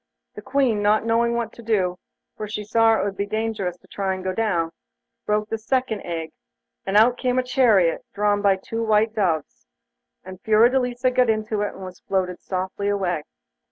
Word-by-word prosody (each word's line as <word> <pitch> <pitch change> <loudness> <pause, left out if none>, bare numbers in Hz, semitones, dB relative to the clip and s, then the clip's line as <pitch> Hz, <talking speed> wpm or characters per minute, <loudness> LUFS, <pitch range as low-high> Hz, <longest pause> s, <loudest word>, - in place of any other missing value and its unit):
The - - -9
Queen, 255 -7 +1
not 210 +2 +2
knowing 235 +1 +2
what 235 -1 -2
to - - -12
do, 190 -6 0 0.4
for 215 - -5
she 210 0 -4
saw 225 +2 +3
it - - 0
would 200 -1 -2
be 200 +1 -2
dangerous 215 -4 -2
to - - -24
try 190 -1 -2
to 185 - -8
go 185 0 -2
down, 180 -6 0 0.6
broke 210 0 0
the 225 - -3
second 240 -2 -1
egg, 165 -2 -5 0.6
and 195 +1 +2
out 240 +3 +5
came 250 -1 0
a 255 - +2
chariot, 230 -10 +3
drawn 205 0 +1
by 200 -1 +4
two 225 +4 -5
white 220 0 +2
doves, 165 - -2 0.6
and 185 0 -10
Fiordelisa 245 +3 +3
got 250 -1 +3
into 215 -1 0
it, 205 - -2
and 190 - -8
was 185 -1 -10
floated 185 -2 -2
softly 190 +2 -3
away. 185 -5 0
210 Hz, 190 wpm, -23 LUFS, 190-230 Hz, 0.6 s, out